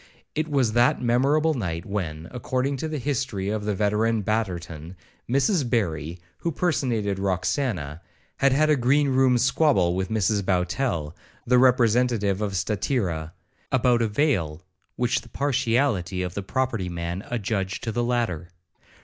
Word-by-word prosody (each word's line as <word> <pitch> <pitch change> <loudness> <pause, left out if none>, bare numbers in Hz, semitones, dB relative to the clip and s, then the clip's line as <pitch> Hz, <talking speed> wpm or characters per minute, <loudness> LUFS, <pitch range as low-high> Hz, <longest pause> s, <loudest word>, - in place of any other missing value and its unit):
It 155 +1 -1
was 135 -7 +1
that 120 +1 +3
memorable 140 +6 +2
night, 85 - -3
when, 85 -6 -4
according 130 +2 -1
to 160 - -3
the 155 -1 -3
history 130 -8 -2
of 105 0 -2
the 105 -1 0
veteran 105 +2 +1
Betterton,1 90 -6 -3 0.4
Mrs 140 - +2
Barry, 85 - -1 0.2
who 170 - -1
personated 120 - 0
Roxana, 90 - -1 0.4
had 140 +3 +3
a - - +5
green 140 +3 +2
room 130 -1 +4
squabble 120 - +3
with 95 0 -2
Mrs 105 -1 +1
Bowtell, 90 - -1 0.3
the 125 +1 +4
representative 120 -5 +3
of 105 -2 -2
Statira, 90 - -1 0.4
about 125 -2 +3
a 115 - +2
veil, 100 - 0 0.3
which 125 0 0
the 115 - -16
partiality 115 -9 0
of 90 -1 -4
the 100 - -3
property 115 -3 -2
man 85 +2 -4
adjudged 100 -5 -2
to 115 - -2
the 120 +2 -1
latter. 115 -9 -1
110 Hz, 140 wpm, -25 LUFS, 95-130 Hz, 0.4 s, a